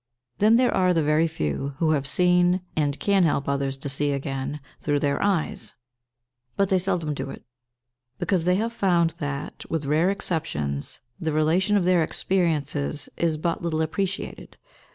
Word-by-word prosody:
Then 215 +3 +5
there 250 +1 +3
are 185 -1 +3
the 165 - +2
very 150 +2 +3
few 135 - -3
who 160 0 +2
have 140 -3 0
seen, 180 +3 +3
and 145 -2 0
can 200 -1 +3
help 145 -4 +1
others 140 -1 -1
to 135 - -6
see 140 +1 0
again, 135 +1 -3 0.2
through 145 -1 0
their 140 0 0
eyes; 200 +1 -1 0.8
but 195 -1 +2
they 190 - +3
seldom 175 -5 -1
do 140 - -5
it, - - -9 0.7
because 180 -4 0
they 180 0 +3
have 225 +4 -1
found 175 -6 +2
that, 145 -1 -4
with 160 -3 -2
rare 155 +6 +2
exceptions, 75 - -2 0.2
the 160 -1 -1
relation 170 +7 +2
of 195 - +1
their 180 -1 +4
experiences 155 -5 -1
is 165 -2 0
but 165 +2 -1
little 160 -2 0
appreciated. 195 +4 -4
160 Hz, 165 wpm, -25 LUFS, 145-185 Hz, 0.8 s, Then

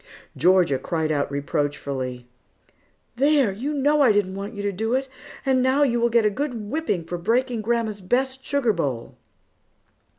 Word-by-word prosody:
Georgia 180 -7 +3
cried 160 +2 -1
out 145 -2 0
reproachfully, 140 -3 -3 0.9
"There, 280 -4 +3
you 245 +10 -4
know 295 +1 +2
I 255 -5 +6
didn't 205 -2 +1
want 200 +3 -6
you 205 - -5
to 205 - 0
do 225 +5 -1
it, 265 +1 -1 0.4
and 260 -1 +3
now 260 +3 +3
you 240 -4 +2
will 235 0 +2
get 230 -1 +3
a 210 - +3
good 275 +4 -3 0.2
whipping 305 - -1
for 175 +2 -5
breaking 235 +5 0
grandma's 220 -2 -1
best 260 +6 -1
sugar 280 -6 +1
bowl!" 135 - -3
220 Hz, 165 wpm, -23 LUFS, 170-260 Hz, 0.9 s, I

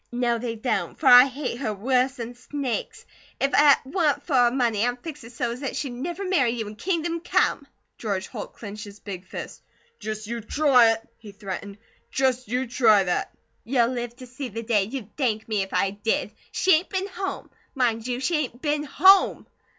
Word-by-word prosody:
"No, 240 -1 0
they 230 -1 -3
don't, 215 -7 -2
for 320 - -7
I 250 -1 +10
hate 255 -2 -4
her 215 -6 -2
worse 255 +5 +1
'n 235 +1 -5
snakes! 255 0 -4 0.3
If 275 - +1
it 290 -1 +7
wa'n't 290 -2 0
for 310 - -4
her 245 -2 +5
money 235 -5 +1
I'd 245 0 -1
fix 305 -3 -7
her 230 - -11
so's 240 +1 -3
'at 270 - -3
she'd 275 - -3
never 345 +10 -4
marry 345 -10 +2
you 230 -2 -3
in 210 - -8
kingdom 335 - -1
come." 340 - +1 0.3
George 200 -4 -2
Holt 215 -5 -8
clenched 210 0 -8
his 205 0 -12
big 185 -2 -8
fist. - - -8 0.4
"Just 215 0 -5
you 235 +2 -4
try 250 -1 +4
it!" 225 0 -9
he 215 -2 -11
threatened. 200 0 -7 0.3
"Just 255 -2 0
you 250 +4 -1
try 230 -5 +4
that!" 180 -1 -1 0.3
"You'll 240 -1 +2
live 240 -2 -4
to 255 0 -11
see 250 +1 -7
the 230 +2 -6
day 215 -4 +2
you'd 220 -1 -7
thank 225 -6 -1
me 215 -3 0
if 195 - -5
I 195 - +1
did. 205 +1 -1 0.2
She 380 - +3
ain't 350 - -5
been 380 -1 -1
home. 385 0 -5 0.2
Mind 235 -3 0
you, 245 0 -2
she 315 +5 0
ain't 250 -5 -3
been 295 +1 0
HOME! 380 +7 +5
245 Hz, 200 wpm, -25 LUFS, 220-275 Hz, 0.4 s, I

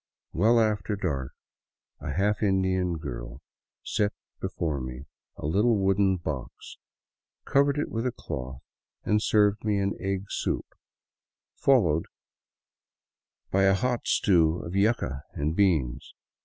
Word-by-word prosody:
Well 115 +7 +4
after 105 -3 +1
dark 70 -9 -3 0.7
a 75 0 -5
half 100 +5 +1
Indian 95 -3 +1
girl - - -7 0.4
set 105 0 0 0.3
before 75 -5 -2
me 65 +1 -7 0.3
a - - -7
little 105 +9 +3
wooden 95 -1 +2
box, 75 -7 -6 0.7
covered 140 +1 +3
it 145 - -2
with 115 +3 -1
a - - 0
cloth, 65 - -6 0.4
and 105 0 +2
served 105 -1 +3
me 105 -2 +1
an 100 0 0
tgg 95 0 -3
soup, - - -2 0.9
followed 90 - +3 1.4
by 95 +1 +3
a 95 0 +5
hot 125 +4 -1
stew 85 -4 +3
of 85 - -6
yuca 100 - +1
and 75 +3 -1
beans. 75 -10 +1
95 Hz, 125 wpm, -27 LUFS, 75-105 Hz, 1.4 s, a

